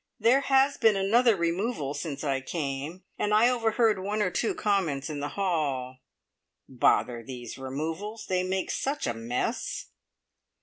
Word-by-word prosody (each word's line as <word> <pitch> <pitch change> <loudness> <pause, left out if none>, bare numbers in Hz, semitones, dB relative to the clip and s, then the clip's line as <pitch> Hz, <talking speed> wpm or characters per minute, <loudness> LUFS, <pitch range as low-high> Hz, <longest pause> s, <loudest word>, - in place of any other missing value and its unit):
There 235 +5 +4
has 275 0 +3
been 220 -2 +4
another 220 +4 +4
removal 170 - -1
since 145 -1 -5
I 135 -2 0
came, 145 +4 -4 0.2
and 210 - 0
I 230 +3 +6
overheard 225 -3 +2
one 205 +3 -2
or 185 - 0
two 225 - 0
comments 165 -9 0
in 145 - -4
the 145 +1 -3
hall. 140 -9 -1 0.7
"Bother 120 -2 +2
these 120 -1 -8
removals. 160 +11 -5
They 185 -1 +1
make 185 0 -1
such 280 +2 -2
a 120 - 0
mess!" 115 +2 -3
180 Hz, 145 wpm, -28 LUFS, 135-215 Hz, 0.7 s, I